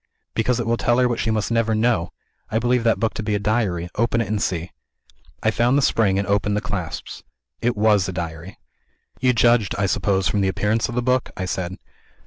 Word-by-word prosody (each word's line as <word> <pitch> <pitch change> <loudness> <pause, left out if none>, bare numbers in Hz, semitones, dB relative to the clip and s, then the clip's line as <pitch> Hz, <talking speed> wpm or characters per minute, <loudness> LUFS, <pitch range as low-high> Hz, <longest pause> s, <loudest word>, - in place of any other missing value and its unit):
"Because 120 +2 +1
it 120 - -1
will 115 +1 +1
tell 120 +1 +2
her 125 -1 +4
what 120 -1 -2
she 110 - 0
must 110 0 -1
never 115 -1 +1
know. 110 -6 +1 0.4
I 110 - 0
believe 120 +1 +1
that 115 - +2
book 115 -1 0
to - - -4
be 105 -1 -1
a - - 0
Diary. 105 -5 0
Open 115 +1 +1
it, 115 - -1
and 105 -1 -1
see." 85 -1 -2 0.7
I 110 - +3
found 120 +4 +2
the 145 - +2
spring 100 -6 +2
and 100 -1 -1
opened 100 +1 +1
the - - +2
clasps. 100 -8 -5 0.4
It 120 -1 0
was 105 -3 +3
a - - -2
Diary. 85 +1 -6 0.6
"You 125 0 +3
judged, 120 -3 +3
I 100 - +1
suppose, 95 0 +1
from 105 - 0
the 95 - +2
appearance 105 +4 0
of 120 - -5
the 125 - 0
book?" 130 0 +1
I 95 - -2
said. 90 0 -3
110 Hz, 225 wpm, -22 LUFS, 95-115 Hz, 0.7 s, her